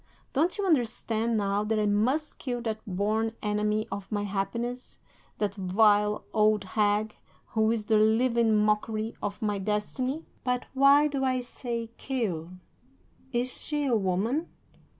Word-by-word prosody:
Don't 325 +8 +1
you 405 - -1
understand, 235 - +1
now, 200 0 0
that 215 +1 0
I 210 - +2
must 245 +10 0
kill 245 -3 -3
that 220 -2 -2
born 215 +4 0
enemy 210 +1 0
of 200 +1 -6
my 205 -1 -1
happiness, 235 +5 -3 0.4
that 205 -2 -1
vile 210 +2 +3
old 215 -1 +3
hag, 210 +2 0 0.3
who 220 -1 +2
is 225 -2 -1
the 220 0 +3
living 225 +1 +3
mockery 215 +1 0
of 200 +1 -4
my 205 -2 0
destiny? 235 +9 -2 0.2
"'But 250 0 -1
why 280 +2 +6
do 280 -2 -2
I 255 -1 +1
say 235 -2 -5
kill? 200 -12 -2 0.8
Is 250 0 +2
she 295 -1 -1
a 250 -4 +2
woman? 215 - 0
220 Hz, 145 wpm, -28 LUFS, 210-250 Hz, 0.8 s, why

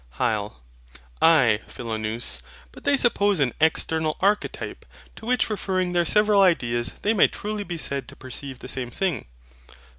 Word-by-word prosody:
HYL. 105 - -1 0.7
Ay, 135 -10 +5
Philonous, 110 - -3 0.3
but - - -15
they 285 - +4
suppose 205 - +3
an 135 -4 +1
external 160 -1 +1
archetype, 205 +2 -1 0.3
to 220 - -10
which 250 0 +2
referring 185 -4 -1
their 175 -1 +2
several 210 +1 +4
ideas 120 -10 +2
they 210 - +3
may 210 - +5
truly 210 0 -4
be 175 -2 -5
said 140 -3 -2
to - - -11
perceive 130 +1 -7
the 125 - -10
same 130 -2 -4
thing. 155 - -2
160 Hz, 150 wpm, -24 LUFS, 120-200 Hz, 0.7 s, Ay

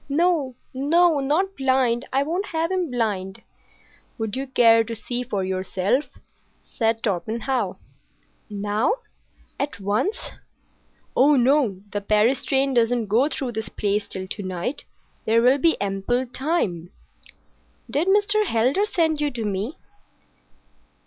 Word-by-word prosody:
"No! 305 -4 +1 0.2
No! 315 +4 +3
Not 335 +8 0
blind! 260 -2 +1
I 270 +1 +2
won't 350 +7 -2
have 330 +1 -1
him 365 -4 -1
blind!" 205 -6 -2 0.7
"Would 220 -3 -3
you 270 +1 -3
care 230 -3 +5
to 230 +1 -6
see 240 +3 -3
for 210 -6 -2
yourself?" 190 +7 0 0.6
said 225 -1 -1
Torpenhow. 225 +6 -1 0.7
"Now,—at 220 - -4
once?" 210 - 0 1.0
"Oh, 285 +3 +5
no! 250 -6 +2
The 205 - -2
Paris 215 +5 +2
train 270 0 +2
doesn't 235 -2 +1
go 245 +8 +3
through 265 -5 -3
this 220 -2 -4
place 205 0 -1
till 190 -1 -4
to 205 - -5
night. 185 +8 -4 0.4
There 230 +1 +3
will 260 +3 +5
be 330 +3 +2
ample 200 +6 -1
time." 240 - -2 1.0
"Did 300 +6 0
Mr. 415 +2 +3
Heldar 255 - +2
send 320 -7 0
you 295 - +1
to 240 -5 -5
me?" 205 - -3
245 Hz, 130 wpm, -23 LUFS, 210-295 Hz, 1.0 s, care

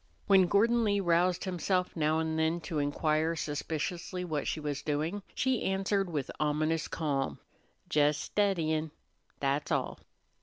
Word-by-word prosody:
When 190 -2 +5
Gordon 230 +5 +3
Lee 205 -2 +2
roused 175 0 +2
himself 180 0 -1
now 155 -1 +2
and 160 0 -1
then 160 +2 +1
to 155 -1 -3
inquire 155 +3 +1
suspiciously 165 +4 -3
what 155 -4 -2
she - - -1
was 145 -2 -3
doing, 155 +7 -2
she 260 -2 +1
answered 195 0 0
with 145 -5 -3
ominous 155 +2 0
calm. 140 -4 -1 0.6
"Jes 150 0 +4
steddyin', 160 -4 0 0.5
that's 140 +1 0
all." - - -1
160 Hz, 140 wpm, -31 LUFS, 150-185 Hz, 0.6 s, When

